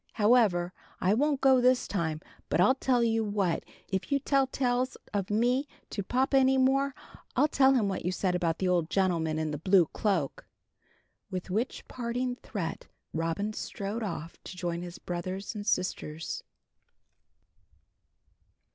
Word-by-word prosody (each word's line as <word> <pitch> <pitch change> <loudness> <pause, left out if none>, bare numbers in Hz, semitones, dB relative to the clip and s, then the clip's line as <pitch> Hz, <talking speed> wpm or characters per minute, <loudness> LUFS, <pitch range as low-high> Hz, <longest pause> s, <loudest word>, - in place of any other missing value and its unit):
However, 205 -6 +3 0.3
I 185 +2 +3
won't 280 +4 +1
go 265 -2 +5
this 250 0 +3
time; 160 -5 -2 0.3
but - - +1
I'll 205 +9 +6
tell 255 -2 +1
you 225 -1 +2
what 200 -5 0 0.2
if 190 +7 -3
you 280 - +4
tell 275 -1 +2
tales 255 -1 0 0.2
of 200 0 -1
me 245 +6 +2 0.2
to 200 - -2
papa 260 +7 +2
any 265 0 +4
more, 270 +1 +2 0.4
I'll 275 +4 +4
tell 270 -2 +4
him 220 -5 +2
what 190 -2 -2
you 180 - 0
said 185 0 0
about 170 -2 0
the 190 - 0
old 175 -3 +1
gentleman 170 -5 +1
in 155 -1 -1
the 150 - -4
blue 185 +1 +5
cloak." 190 - -1 0.8
With 185 0 -5
which 225 +7 -2
parting 245 +1 -2
threat 175 -10 -5 0.3
Robin 165 +6 -1
strode 205 +2 -4
off 170 -6 -5
to 185 - -8
join 170 -1 -2
his 175 -1 -7
brothers 185 +3 -4
and 205 -1 -6
sisters. 160 -3 -2
205 Hz, 155 wpm, -29 LUFS, 175-250 Hz, 0.8 s, I'll